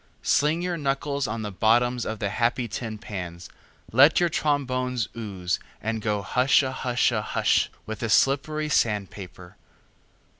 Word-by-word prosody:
Sling 155 +5 +2
your 180 -1 -2
knuckles 140 0 -1
on 110 +1 -4
the 105 - -4
bottoms 120 +4 +2
of 110 - -3
the 105 - -2
happy 120 +2 0
tin 110 0 -5
pans, 90 -4 -7 0.4
let 135 +7 +6
your 175 -1 +2
trombones 130 -6 -1
ooze, 95 -6 -3 0.2
and 110 0 -3
go 105 -2 -1
hushahusha 125 -3 +2
hush - - +1 0.2
with 110 -1 -6
the 115 - -3
slippery 150 +6 +2
sand 105 -8 +1
paper. 90 -2 -11
120 Hz, 140 wpm, -25 LUFS, 105-135 Hz, 0.4 s, let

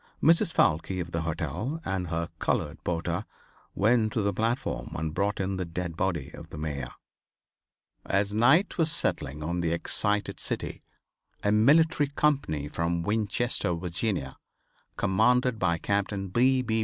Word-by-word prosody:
Mrs. 165 +1 +5
Foulke 85 - +2
of 85 -1 -4
the 85 - -1
hotel, 85 - -3
and 95 -2 -2
her 85 0 -2
colored 75 +2 -1
porter, 85 +2 -1 0.5
went 110 +1 +3
to 110 - 0
the 100 0 +1
platform 115 +6 -1
and 80 0 -3
brought 100 +4 0
in 95 0 -1
the 95 - -1
dead 85 0 -4
body 85 -6 -1
of - - -10
the - - -9
Mayor. 70 -4 -3 1.2
As 100 +1 0
night 135 - +4
was 160 -1 +3
settling 75 - -1
on 85 +3 -1
the 85 -1 0
excited 105 +4 0
city - - -2 0.6
a 105 - +2
military 145 +8 +4
company 140 - 0
from 85 +2 -1
Winchester, 105 -1 0
Virginia, 85 - -2 0.6
commanded 125 +4 +2
by 85 -3 +2
Captain 100 0 -1
B. 130 +5 +3
B. 110 -2 0
95 Hz, 145 wpm, -28 LUFS, 85-115 Hz, 1.2 s, Mrs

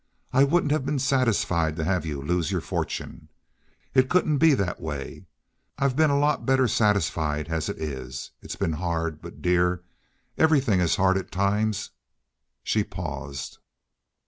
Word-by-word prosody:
I 135 +2 +6
wouldn't 150 0 +2
have 150 -2 +1
been 140 +2 -1
satisfied 115 - +1
to 80 - -2
have 90 -1 0
you 70 -3 -4
lose 85 0 0
your - - 0
fortune. - - -4 0.6
It 130 0 +4
couldn't 155 -5 +2
be 160 -3 +6
that 95 -7 -2
way. 70 -4 -6 0.5
I've 140 -2 +1
been 155 +1 +4
a 140 - +2
lot 145 +1 +1
better 130 -1 +3
satisfied 80 -9 +1
as 80 -2 -1
it - - -4
is. 65 -4 -6
It's - - -6
been 80 - -1
hard, 80 -1 -2
but, 85 0 -11
dear, 90 0 +2 0.6
everything 140 - +4
is 85 -2 +2
hard 95 0 +3
at 95 - -8
times." 105 +2 0 0.7
She - - +1
paused. 70 -1 -6
95 Hz, 155 wpm, -25 LUFS, 80-135 Hz, 0.7 s, I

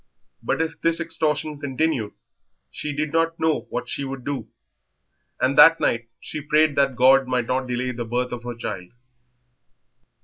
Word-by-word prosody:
But 165 - 0
if 165 - -6
this 165 0 +2
extortion 155 -2 -1
continued 135 -5 -1 0.6
she 150 - -4
did 150 +1 -3
not 165 0 +1
know 160 -1 0
what - - -4
she 140 - -3
would 135 -2 -6
do, 140 -2 -4 0.9
and 130 +2 +1
that 165 +2 +8
night 115 0 0
she 155 - -6
prayed 150 0 +2
that 140 -2 +2
God 130 +1 +5
might 125 -2 0
not 130 +2 -1
delay 125 +1 -2
the 120 -1 -5
birth 120 +2 -2
of 125 -1 -5
her 120 0 -6
child. 90 -5 -6
135 Hz, 165 wpm, -23 LUFS, 125-155 Hz, 0.9 s, that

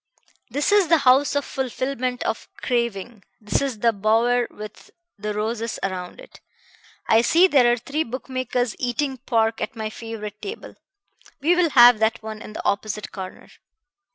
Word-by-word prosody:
"This 285 - 0
is 410 -3 +4
the 330 0 +5
house 270 +3 +4
of 285 - 0
fulfilment 255 -1 -3
of 225 - -3
craving, 235 -3 -2 0.2
this 210 -2 -1
is 270 -5 -2
the 230 -1 +3
bower 230 +4 +2
with 215 0 -11 0.3
the 210 +1 -3
roses 220 +2 -3
around 185 -2 -4
it. - - -15 0.7
I 225 - +5
see 335 +9 +5
there 265 -9 +4
are 240 - +1
three 280 +6 -2
bookmakers 255 -1 -3
eating 260 +2 -2
pork 225 -3 0
at - - -4
my 220 -1 -4
favorite 215 -2 -8
table. 415 +3 -7 0.7
We 335 +5 +3
will 350 -2 +3
have 240 -4 +7
that 220 0 0
one 220 -1 -7
in 215 - -9
the - - -7
opposite 210 +1 -2
corner." 190 -2 -9
235 Hz, 160 wpm, -23 LUFS, 215-260 Hz, 0.7 s, have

